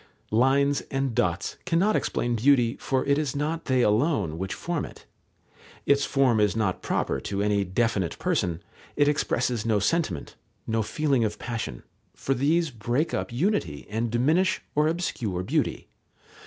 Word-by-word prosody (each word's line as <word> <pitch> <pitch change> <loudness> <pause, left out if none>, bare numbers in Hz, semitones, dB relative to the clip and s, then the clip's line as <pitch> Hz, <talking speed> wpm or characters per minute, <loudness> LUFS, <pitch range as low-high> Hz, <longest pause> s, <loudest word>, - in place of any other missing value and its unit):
Lines 135 +5 +3
and 135 -2 -1
dots 85 -3 -1
cannot 180 +5 +2
explain 120 0 0
beauty, 120 0 +3
for 130 -1 0
it 140 +1 +2
is 145 -4 -2
not 155 +3 -2
they 130 -2 +2
alone 105 - +1
which 95 +2 -3
form 170 -3 -2
it. - - -10 0.8
Its 140 0 +3
form 130 -6 +2
is 105 -2 +2
not 100 -5 0
proper - - -1
to 100 0 -2
any 105 -1 +2
definite 100 -2 0
person, 85 0 -1 0.3
it 145 0 +3
expresses 125 -5 0
no 110 -2 +2
sentiment, 100 - -1 0.3
no 115 0 0
feeling 140 +2 +1
of 105 -1 -1
passion, 115 - -5 0.3
for 135 - -1
these 155 +4 +1
break 120 +7 -1
up - - -2
unity 120 - -1
and 115 +2 -1
diminish 160 +11 +2
or 150 +1 +3
obscure 120 - -2
beauty. - - -1
120 Hz, 155 wpm, -26 LUFS, 105-145 Hz, 0.8 s, Lines